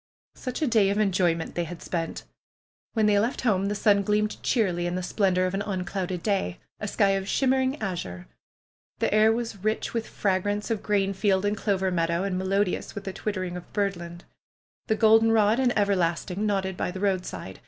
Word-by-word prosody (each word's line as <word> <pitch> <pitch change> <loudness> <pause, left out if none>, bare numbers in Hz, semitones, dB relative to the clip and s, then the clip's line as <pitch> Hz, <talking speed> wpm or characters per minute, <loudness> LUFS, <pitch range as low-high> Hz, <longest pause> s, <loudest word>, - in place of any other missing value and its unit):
Such 255 +4 -4
a - - +2
day 220 -5 +4
of 200 - 0
enjoyment 180 -5 +1
they 175 - -1
had 165 +1 -8
spent! 165 -2 -3 0.7
When 220 -2 +2
they 205 -1 +4
left 230 +5 -1
home 200 -5 +1
the 205 - -1
sun 200 0 +3
gleamed 210 +1 0
cheerily 180 -8 +1
in 175 - -2
the 185 - -2
slpendor 185 -1 +1
of 185 - -2
an 195 - -1
unclouded 185 -2 -3
sky; 195 - -1 0.2
a 210 - -3
sky 200 0 +2
of 195 0 -1
shimmering 265 +3 +1
azure. 170 - -4 0.7
The - - 0
air 215 +1 +5
was 225 -4 -3
rich 215 +1 -1
with 230 -1 -2
fragrance 205 +3 -1
of 220 -3 -1
grain 195 -2 +1
field 195 0 +1
and 205 +1 +1
clover 190 -2 0
meadow, 170 0 0
and 195 -2 -1
melodious 190 +1 -1
with 205 - -5
the 190 - -5
twittering 185 -4 -3
of 180 - -9
birdland. 175 -4 -3 0.6
The 220 - +2
goldenrod 225 0 +4
and 255 -2 +3
everlasting 195 0 0
nodded 190 -2 -1
by - - -2
the 185 +1 -6
roadside. 185 - -2
200 Hz, 185 wpm, -26 LUFS, 185-215 Hz, 0.7 s, air